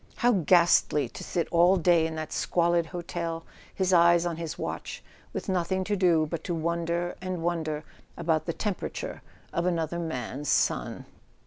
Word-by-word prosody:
How 245 - +3
ghastly 170 - +4
to - - -9
sit 170 - -1
all 175 +3 +5
day 170 -2 +4
in 160 - -6
that 155 -1 -5
squalid 170 -1 +1
hotel, 170 -1 -4 0.3
his 190 -1 +1
eyes 170 0 +5
on 170 -2 -2
his 165 -2 -5
watch, - - -5 0.3
with - - -5
nothing 185 0 0
to 205 +2 -1
do 175 -5 +3
but 160 0 -5
to 175 - -1
wonder 170 +1 -1
and 185 -2 -4
wonder 160 -3 -1 0.3
about 160 -2 0
the 170 - 0
temperature 205 0 -4 0.3
of 170 +1 0
another 170 -1 -1
man's 145 -3 -4
son! - - 0
170 Hz, 160 wpm, -27 LUFS, 160-175 Hz, 0.3 s, all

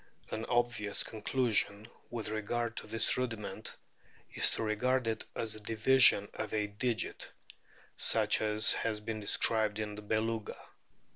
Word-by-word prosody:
An 110 +1 -3
obvious 120 -4 0
conclusion 110 -2 0 0.2
with 115 -3 -4
regard 115 +2 -2
to - - -5
this 115 0 +1
rudiment 110 -4 -3 0.6
is - - +3
to - - -2
regard 125 +4 +1
it 110 -1 -2
as 110 -1 -2
a 110 - -6
division 110 0 +4
of 110 - -4
a 105 -1 +1
digit, 110 +3 -3 0.7
such - - +3
as 110 0 +3
has 110 -2 -1
been 110 0 -4
described 105 0 +2
in 105 -1 -3
o - - -8
' - - -12
the - - -6
Beluga. 110 +1 -1
110 Hz, 150 wpm, -32 LUFS, 105-115 Hz, 0.7 s, division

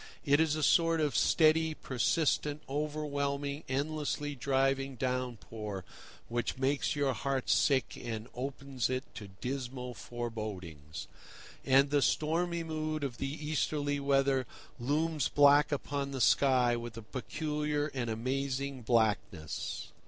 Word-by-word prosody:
It 145 0 +4
is 160 -2 +3
a 155 - -2
sort 165 0 +4
of 150 -2 +1
steady, 160 0 +4
persistent, 150 +3 0
overwhelming, 145 0 -2
endlessly 145 +1 -1
driving 135 0 +1
downpour, 115 -6 -3 0.4
which 120 +1 -2
makes 135 +3 +1
your 140 -2 +1
heart 135 +2 -1
sick, 135 -5 +3
and 115 -1 -4
opens 135 -1 -3
it 130 0 -1
to 105 - -8
dismal 125 +4 -5
forebodings. 100 -11 -6 0.6
And 135 +1 +4
the 145 -1 +3
stormy 170 +4 +1
mood 155 -1 -3
of 130 -4 -3
the 135 - -1
Easterly 150 -1 -1
weather 135 -2 +2 0.3
looms 150 +3 +1
black 145 +1 +5
upon 140 -1 -2
the 135 -1 -4
sky 125 -2 +4
with 120 -1 -6
a 115 - -7
peculiar 150 +4 -2
and 125 -3 -2
amazing 135 +3 -2
blackness. 110 -9 0
135 Hz, 125 wpm, -32 LUFS, 125-150 Hz, 0.6 s, black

